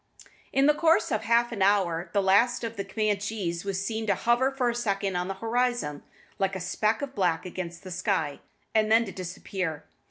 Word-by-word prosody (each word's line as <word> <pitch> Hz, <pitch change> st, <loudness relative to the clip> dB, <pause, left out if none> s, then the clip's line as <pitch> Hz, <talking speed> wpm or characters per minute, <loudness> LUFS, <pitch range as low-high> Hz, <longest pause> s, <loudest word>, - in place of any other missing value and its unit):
In 270 Hz, +1 st, +3 dB
the 300 Hz, -, +6 dB
course 320 Hz, -6 st, +3 dB
of 215 Hz, -, +1 dB
half 235 Hz, +2 st, +3 dB
an 215 Hz, -4 st, -4 dB
hour 185 Hz, -4 st, +2 dB
the 200 Hz, -1 st, +1 dB
last 220 Hz, +6 st, +3 dB
of 230 Hz, 0 st, -4 dB
the 200 Hz, -, -3 dB
Camanchees 200 Hz, -3 st, -2 dB
was 195 Hz, -1 st, -2 dB
seen 220 Hz, +1 st, -3 dB
to 200 Hz, -, +3 dB
hover 240 Hz, +6 st, +2 dB
for 270 Hz, -2 st, -1 dB
a -, -, -4 dB
second 200 Hz, -5 st, -1 dB
on 180 Hz, 0 st, -1 dB
the 195 Hz, -, -3 dB
horizon, 230 Hz, -8 st, -1 dB, 0.4 s
like 195 Hz, -1 st, 0 dB
a -, -, -3 dB
speck 215 Hz, +6 st, 0 dB
of 275 Hz, -1 st, -5 dB
black 180 Hz, -6 st, 0 dB
against 175 Hz, -1 st, -6 dB
the 185 Hz, -, -8 dB
sky, 175 Hz, -5 st, -1 dB, 0.3 s
and 215 Hz, -1 st, +2 dB
then 230 Hz, +1 st, +5 dB
to 195 Hz, -, -6 dB
disappear. 180 Hz, -3 st, -4 dB
200 Hz, 200 wpm, -27 LUFS, 185-230 Hz, 0.4 s, the